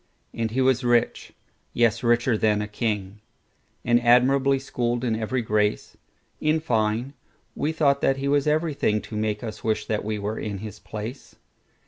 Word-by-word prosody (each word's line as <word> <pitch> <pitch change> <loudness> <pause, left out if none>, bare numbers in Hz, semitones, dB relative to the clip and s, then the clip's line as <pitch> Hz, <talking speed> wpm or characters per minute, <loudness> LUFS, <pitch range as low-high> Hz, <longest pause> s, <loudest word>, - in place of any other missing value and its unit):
And 115 -1 -2
he 125 +4 -1
was 130 -1 +2
rich,—yes, 120 -1 -1
richer 120 0 +2
than 105 -1 +2
a 105 - -3
king,—And 105 +2 -3
admirably 130 +3 +4
schooled 120 -2 -2
in 115 -3 0
every 115 +3 -2
grace:In 110 +8 -2
fine, 115 -2 -1 0.4
we 150 - -1
thought 140 -3 +2
that 135 - +2
he 135 +1 -3
was 145 +1 +2
everythingTo 150 -9 0
make 105 0 -2
us 110 -2 -7
wish 110 -1 0
that 110 -1 -2
we 110 0 -2
were 105 +2 -3
in 105 -2 -4
his 105 0 -8
place. 110 +5 -8
115 Hz, 145 wpm, -24 LUFS, 105-130 Hz, 0.4 s, admirably